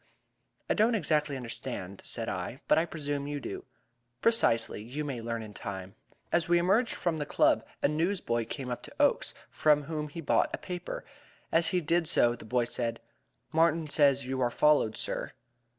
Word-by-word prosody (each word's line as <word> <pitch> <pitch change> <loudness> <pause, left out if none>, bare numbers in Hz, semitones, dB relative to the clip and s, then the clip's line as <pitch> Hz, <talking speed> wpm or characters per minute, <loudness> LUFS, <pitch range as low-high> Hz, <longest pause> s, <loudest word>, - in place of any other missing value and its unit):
"I - - +2
do 215 - +4
not 235 0 +2
exactly 150 -6 +1
understand," 115 -6 -5
said - - -4
I, - - -4
"but - - +5
I 165 - +1
presume 145 -3 -3
you 145 0 -3
do." - - -6 0.5
"Precisely. 115 - +3
You 135 +7 -5
may 130 -5 -4
learn 115 0 -3
in 105 -1 -10
time." 95 -2 -6 0.4
As 170 -1 +1
we 175 - +5
emerged 200 +7 +2
from 170 -3 -1
the 150 - -2
Club - - +3 0.2
a - - +6
newsboy 150 - 0
came 130 -1 -5
up 120 - -3
to - - -12
Oakes, - - +2 0.2
from 150 -1 +3
whom 150 0 -3
he 155 - -8
bought 155 - +2
a - - -10
paper, 180 -1 -6 0.5
and - - +5
as 165 - +1
he 180 - +1
did 165 +1 +1
so, 120 -8 +3
the 120 - -12
boy 120 +1 +1
said: 115 -1 -2 0.5
"Martin 165 0 +3
says 140 -3 +4
you 130 0 -2
are 120 - +3
followed, 145 -4 +3
sir." - - -3
145 Hz, 190 wpm, -30 LUFS, 120-165 Hz, 0.5 s, a